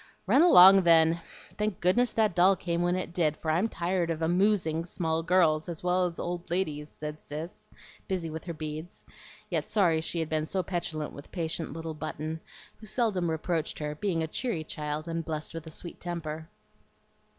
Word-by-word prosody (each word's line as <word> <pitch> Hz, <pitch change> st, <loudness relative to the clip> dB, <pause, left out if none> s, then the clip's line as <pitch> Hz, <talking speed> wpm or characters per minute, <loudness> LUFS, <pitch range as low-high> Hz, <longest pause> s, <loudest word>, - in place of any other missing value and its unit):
"Run 280 Hz, -, +5 dB
along 195 Hz, -, +9 dB
then. 165 Hz, -1 st, +5 dB, 0.4 s
Thank 210 Hz, -3 st, -1 dB
goodness 235 Hz, +8 st, +3 dB
that 215 Hz, -4 st, +2 dB
doll 185 Hz, +3 st, +5 dB
came 170 Hz, -2 st, -2 dB
when 175 Hz, +1 st, +2 dB
it 185 Hz, -2 st, -3 dB
did, 155 Hz, -4 st, +1 dB
for 160 Hz, -, -2 dB
I'm 180 Hz, +8 st, +1 dB
tired 175 Hz, -2 st, -1 dB
of 165 Hz, -1 st, -2 dB
'amoosing' 175 Hz, -2 st, +2 dB
small 165 Hz, -2 st, -1 dB
girls 165 Hz, -2 st, +3 dB
as 170 Hz, -1 st, -5 dB
well 180 Hz, 0 st, +2 dB
as 170 Hz, -, -8 dB
old 175 Hz, 0 st, -4 dB
ladies," 155 Hz, -4 st, -2 dB
said 150 Hz, 0 st, -7 dB
Cis, 155 Hz, +4 st, -8 dB, 0.4 s
busy 185 Hz, -3 st, -2 dB
with 160 Hz, 0 st, -6 dB
her 170 Hz, -, -4 dB
beads, 155 Hz, +2 st, -6 dB, 0.5 s
yet -, -, -1 dB
sorry 170 Hz, -7 st, +3 dB
she 165 Hz, +1 st, -2 dB
had 160 Hz, -, -1 dB
been 155 Hz, 0 st, -1 dB
so 185 Hz, +1 st, -1 dB
petulant 160 Hz, -4 st, -3 dB
with 140 Hz, -, -12 dB
patient 165 Hz, -3 st, -3 dB
little 165 Hz, 0 st, -5 dB
Button, 155 Hz, +1 st, -5 dB, 0.4 s
who 215 Hz, -, -12 dB
seldom 195 Hz, -7 st, 0 dB
reproached 160 Hz, 0 st, -1 dB
her, 150 Hz, -1 st, -3 dB
being 165 Hz, 0 st, -1 dB
a -, -, -2 dB
cheery 190 Hz, -1 st, -2 dB
child, 150 Hz, +1 st, -4 dB
and 165 Hz, 0 st, -2 dB
blessed 155 Hz, -2 st, -4 dB
with 165 Hz, -1 st, -7 dB
a -, -, -5 dB
sweet 170 Hz, +2 st, -8 dB
temper. 160 Hz, -2 st, -5 dB
165 Hz, 185 wpm, -29 LUFS, 155-180 Hz, 0.5 s, along